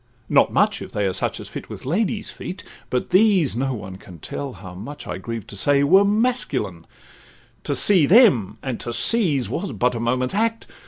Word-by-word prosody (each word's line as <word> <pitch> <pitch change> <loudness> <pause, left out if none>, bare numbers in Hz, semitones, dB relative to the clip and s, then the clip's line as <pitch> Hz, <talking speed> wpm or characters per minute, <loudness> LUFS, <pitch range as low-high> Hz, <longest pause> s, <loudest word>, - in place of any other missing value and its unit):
not - - +4
much, - - +1
if - - -8
they 105 - -1
Are 95 - 0
such 90 - -2
as - - -8
fit - - -9
with - - -9
ladies' 210 - -1
feet, 185 0 -8 0.3
but 125 +6 -2
these 185 - +3
(No 135 +1 -1
one 95 -4 -8
can 95 -3 -13
tell 135 - -6
how 95 -1 -11
much 115 +11 -9
I - - -5
grieve 115 -3 -6
to - - -10
say) 140 +7 +2
Were 190 +8 +5
masculine; 235 +5 -1 0.8
to - - -1
see 180 -8 +5
them, 185 - +5
and 130 -3 -4
to 120 - -5
seize, 160 - +2
Was 195 +3 -4
but 125 0 +1
a 115 - -4
moment's 125 +2 0
act. 225 +2 -1
140 Hz, 200 wpm, -22 LUFS, -, 0.8 s, Were